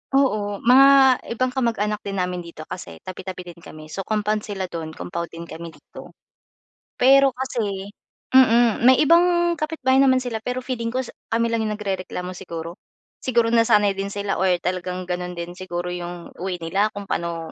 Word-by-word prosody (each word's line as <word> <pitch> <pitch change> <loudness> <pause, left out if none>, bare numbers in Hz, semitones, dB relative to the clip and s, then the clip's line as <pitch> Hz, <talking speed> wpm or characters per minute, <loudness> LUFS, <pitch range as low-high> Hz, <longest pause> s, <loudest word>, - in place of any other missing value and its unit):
Oo, 210 -7 +1
mga 265 +1 +7 0.2
ibang 255 0 0
kamag-anak 215 -5 -1
din 195 -1 -5
namin 180 -1 -2
dito 165 -2 -10
kasi 180 - -8
tabi, 185 - -7
tabi 185 -1 -6
din 170 -1 -12
kami 155 -1 -11
so 195 - -3
compound 210 +1 -1
sila 195 -3 -4
do'n, 165 -3 -6
compound 170 -1 -5
din 170 0 -9
kami 165 +1 -8
dito. 160 - -14 0.8
Pero 270 +1 +5
kasi, 210 -7 -3 0.4
mm, 240 -3 +5
may 260 - +8
ibang 345 +1 +3
kapitbahay 290 -4 +1
naman 260 -1 +4
sila 230 -3 -3
pero 250 +3 -4
feeling 240 -2 -3
ko 260 - 0 0.2
kami 230 0 0
lang 230 - 0
yung 210 - -2
nagrereklamo 185 -3 -4
siguro? 170 -1 -7 0.4
Siguro 235 -2 +1
nasanay 225 -3 +4
din 195 - -2
sila 200 -1 -3
or 190 - +2 0.2
talagang 180 0 -3
gano'n 180 0 -4
din 170 0 -6
siguro 180 -1 -4
yung 175 -1 -7
way 185 +1 -3
nila 195 +6 +1
kung 205 - -5
paano 170 -4 -4
205 Hz, 170 wpm, -22 LUFS, 180-250 Hz, 0.8 s, may